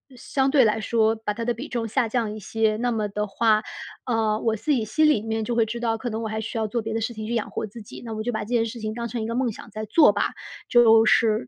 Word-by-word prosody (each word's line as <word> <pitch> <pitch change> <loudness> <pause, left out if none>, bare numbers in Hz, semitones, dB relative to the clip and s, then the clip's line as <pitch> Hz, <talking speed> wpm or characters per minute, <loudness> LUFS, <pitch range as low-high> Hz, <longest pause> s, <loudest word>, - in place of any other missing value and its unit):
相 265 +2 0
对 270 -3 +5
来 215 0 +2
说 220 0 +2
把 220 -1 -3
它 230 - -4
的 240 - +1
比 260 +7 -7
重 230 -2 -3
下 235 +2 +1
降 220 -2 -1
一 - - -7
些。 215 +1 0
那 245 +2 0
么 215 -2 -1
的 210 +1 -2
话， 215 +1 +2 0.4
呃， 220 -3 +1
我 225 -1 +1
自 300 +8 -2
己 250 -6 +2
心 310 +8 +2
里 295 -9 +3
面 220 0 -2
就 235 +1 -2
会 230 - +3
知 235 +2 -4
道， 225 -1 0
可 245 - -3
能 225 0 -4
我 - - -2
还 220 0 -3
需 225 +2 -5
要 220 - 0
做 235 +2 -2
别 220 0 -4
的 225 - 0
事 225 +2 -2
情 215 -1 -6
去 235 - -2
养 225 - -2
活 215 - -3
自 225 +3 -11
己， - - -11
那 225 - -6
我 215 0 -4
就 245 - -1
把 220 - -3
这 210 - -5
件 235 -2 +1
事 230 +1 -6
情 215 0 -3
当 235 0 -3
成 235 0 -4
一 220 - -3
个 230 - -3
梦 250 -2 +1
想 210 - -11
在 215 +1 -6
做 290 +8 +6
吧。 - - -1 0.4
就 225 -2 +6
是 215 - +3
225 Hz, 330 characters per minute, -24 LUFS, 215-235 Hz, 0.4 s, 做